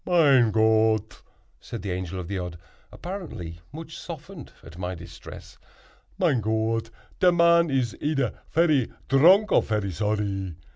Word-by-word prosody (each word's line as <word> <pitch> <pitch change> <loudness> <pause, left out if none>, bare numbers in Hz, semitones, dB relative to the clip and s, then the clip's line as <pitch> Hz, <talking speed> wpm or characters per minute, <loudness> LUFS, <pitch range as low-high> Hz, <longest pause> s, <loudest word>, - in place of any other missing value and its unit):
"Mein 140 -9 +4
Gott!" 110 -1 +2 0.4
said 115 -5 -8
the 100 - -3
Angel 90 0 -4
of 90 - -6
the 100 0 -3
Odd, 90 -2 -6 0.3
apparently 105 - -7
much 160 +2 -9
softened 165 -1 -9
at 80 +1 -12
my 90 0 -3
distress; 85 0 -12 0.6
"mein 165 - +2
Gott, 110 +1 -1 0.3
te 180 - +5
man 170 -1 +4
is 130 -4 0
eder 145 -4 0
ferry 155 -7 +2 0.2
dronk 180 +10 +5
or - - +5
ferry 105 -3 -2
zorry. 100 -2 -2
115 Hz, 140 wpm, -25 LUFS, 100-160 Hz, 0.6 s, te